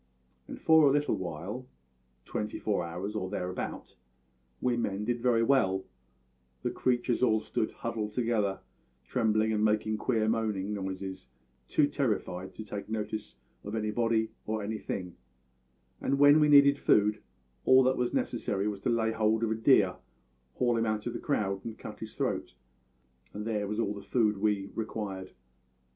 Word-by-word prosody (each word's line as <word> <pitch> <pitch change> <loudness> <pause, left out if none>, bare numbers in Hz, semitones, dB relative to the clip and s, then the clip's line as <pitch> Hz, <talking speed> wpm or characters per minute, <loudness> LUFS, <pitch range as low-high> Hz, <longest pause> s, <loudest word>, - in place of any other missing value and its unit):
And - - -8
for 160 -2 +6
a - - +5
little 145 +1 +2
while 95 +7 -5 0.6
twenty 105 - -3
four 100 -4 0
hours, 90 +5 -5
or 95 -3 -2
thereabout 90 -2 -4 0.6
we 125 -1 +1
men 105 -3 -2
did 120 +1 -1
very 120 -2 +3
well; 95 -7 +2 0.8
the - - 0
creatures 120 -1 0
all 110 -4 +4
stood 110 - -2
huddled 110 -2 -4
together, 110 -5 0 0.4
trembling 110 - +1
and 105 0 +1
making 110 0 +1
queer 110 -3 +1
moaning, 105 -3 0
noises, 95 -2 -5 0.4
too 150 - +3
terrified 95 -9 -2
to 110 - -7
take 105 -1 -6
notice 110 -4 -4 0.3
of 105 +2 -5
anybody 110 +1 0 0.2
or 110 -1 -2
anything, 100 -4 -4 0.8
and 140 - +1
when 145 +2 +7
we 150 -1 +4
needed 140 -1 +7
food 105 0 +3 0.4
all 130 0 +6
that 130 +1 +3
was 125 -1 0
necessary 105 -4 -1
was 105 -2 -3
to 100 - -1
lay 115 -1 +2
hold 110 0 +1
of 110 - +1
a - - +1
deer, 110 - +4 0.6
haul 120 -2 +2
him 115 - +1
out 110 -1 -1
of 120 - -3
the - - -4
crowd, 100 -9 -1
and 115 -1 -6
cut - - -9
his - - -8
throat - - -2 0.8
and 105 +1 -4
there 105 -3 -1
was 105 +2 -3
all 105 -3 0
the 100 - -8
food 105 0 +1
we 105 -2 +1
required. 100 -4 -5
110 Hz, 160 wpm, -30 LUFS, 100-120 Hz, 0.8 s, when